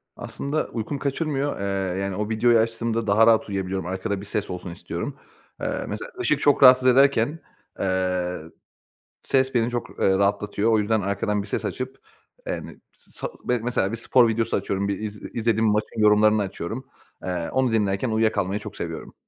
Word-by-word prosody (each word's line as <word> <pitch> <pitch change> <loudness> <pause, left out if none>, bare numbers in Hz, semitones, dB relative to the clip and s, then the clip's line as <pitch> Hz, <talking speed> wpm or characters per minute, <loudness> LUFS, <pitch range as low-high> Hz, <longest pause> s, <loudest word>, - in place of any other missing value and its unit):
Aslında 150 +2 -3
uykumu 120 +5 -4
kaçırmıyor. 145 -1 -1
Eee, 95 -1 -2
yani, 95 -1 -2
o 105 +1 -2
videoyu 115 +2 +4
açtığımda 115 0 -1
daha 110 +3 +5
rahat 110 -2 +4
uyuyabiliyorum. 95 -2 -3
Arkada 95 +2 -3
bir - - -8
ses 105 0 -3
olsun 90 -1 -6
istiyorum. 85 - -5 0.4
Eee, - - -2
mesela, - - -6
ışık - - +2
çok 145 -1 +3
rahatsız 130 0 +8
ederken, 135 +3 +4 0.4
eee, 90 -2 0 0.8
ses 130 -1 +1
beni 115 0 +2
çok, 120 -1 -3
eee, 95 0 +3
rahatlatıyor. 100 +2 +1
O 110 - +4
yüzden 105 +1 +1
arkadan 100 +1 -1
bir 100 - -8
ses - - -2
açıp, 130 +1 -4 0.5
eee, - - -1
yani, - - -7 0.2
sal - - -7 0.3
mesela, 115 -5 0
bir 115 - -3
spor 120 +1 +4
videosu 115 0 0
açıyorum. 100 +1 -2
Bir 100 -1 -2
iz 105 -1 -6
izlediğim 115 -1 +1
maçın 105 +2 0
yorumlarını 105 0 +5
açıyorum. 100 +6 -5 0.4
Eee, 90 -2 -3
onu 130 -2 +1
dinlerken 105 +1 +1
uyuya 110 0 +2
kalmayı 100 0 -1
çok - - -9
seviyorum. - - -6
110 Hz, 170 wpm, -24 LUFS, 100-120 Hz, 0.8 s, rahatsız